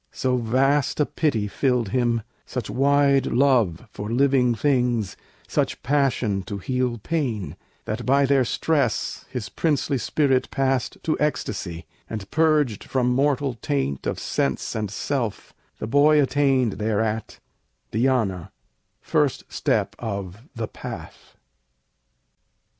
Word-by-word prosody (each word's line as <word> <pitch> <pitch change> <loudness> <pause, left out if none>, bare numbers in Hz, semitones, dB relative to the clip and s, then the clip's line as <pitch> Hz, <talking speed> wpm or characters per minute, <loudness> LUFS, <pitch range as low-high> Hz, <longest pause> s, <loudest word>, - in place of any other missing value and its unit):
So 130 -1 0
vast 135 +5 +1
a 150 - +4
pity 120 -12 0
filled 125 -1 0
him, 120 0 +1 0.2
such 120 -5 -5
wide 140 +2 +3
love 120 -7 +2
For 105 +1 -6
living 125 -1 +3
things, 120 - +1 0.3
such - - -1
passion 130 -8 +1
to 100 - -4
heal 125 +3 -1
pain, 120 - -2 0.3
That 110 +3 -3
by 140 +3 +4
their 135 -1 +3
stress 145 +4 0
his 125 -5 -4
princely 145 - 0
spirit 135 -1 +1
passed 135 -2 0
To 155 - 0
ecstasy, 95 - -2 0.2
and, 105 -3 -6
purged 155 -9 +2
from 125 -2 +1
mortal 140 0 +1
taint 70 -1 -1
Of - - -1
sense - - -1
and 105 -2 -2
self, 120 +1 -3 0.2
the - - -4
boy 145 +6 +5
attained 135 -5 +2
thereat 110 0 -1 0.5
Dhyâna, 110 -7 +1 0.5
first - - +1
step - - 0
of 100 -3 -5
"the 115 -1 -3
Path." - - -9
125 Hz, 120 wpm, -24 LUFS, 110-140 Hz, 0.5 s, boy